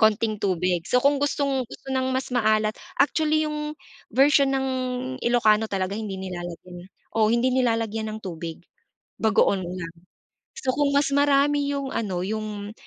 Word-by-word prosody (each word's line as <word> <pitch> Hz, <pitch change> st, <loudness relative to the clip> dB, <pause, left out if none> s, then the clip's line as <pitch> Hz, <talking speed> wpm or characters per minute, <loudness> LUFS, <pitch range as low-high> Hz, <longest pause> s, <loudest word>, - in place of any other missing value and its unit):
konting 220 Hz, -1 st, +2 dB
tubig. 180 Hz, -2 st, +1 dB
So 250 Hz, -, +2 dB
kung 280 Hz, +2 st, +3 dB
gustong-gusto 270 Hz, -2 st, -2 dB
ng 260 Hz, 0 st, 0 dB
mas 260 Hz, 0 st, -2 dB
maalat, 215 Hz, -2 st, +2 dB, 0.3 s
actually 310 Hz, +2 st, +2 dB
'yung 300 Hz, 0 st, -4 dB, 0.3 s
version 275 Hz, +2 st, +4 dB
ng 270 Hz, 0 st, 0 dB, 0.5 s
Ilokano 220 Hz, -2 st, +3 dB
talaga 190 Hz, -1 st, -2 dB
hindi 210 Hz, -2 st, -4 dB
nilalagyan 175 Hz, -1 st, -7 dB
eh -, -, -48 dB, 0.2 s
oo 220 Hz, -1 st, +3 dB
hindi 235 Hz, +2 st, +2 dB
nilalagyan 225 Hz, -3 st, 0 dB
ng 215 Hz, -, -5 dB
tubig, 165 Hz, -2 st, -6 dB, 0.6 s
bagoong 200 Hz, -3 st, +2 dB
lang. 175 Hz, -1 st, -6 dB, 0.6 s
So 255 Hz, -2 st, -1 dB
kung 285 Hz, 0 st, +2 dB
mas 280 Hz, -1 st, +2 dB
marami 285 Hz, 0 st, +3 dB
'yung 275 Hz, -1 st, -3 dB
ano, 185 Hz, -5 st, -2 dB
'yung 210 Hz, -1 st, -4 dB
225 Hz, 145 wpm, -24 LUFS, 200-275 Hz, 0.6 s, version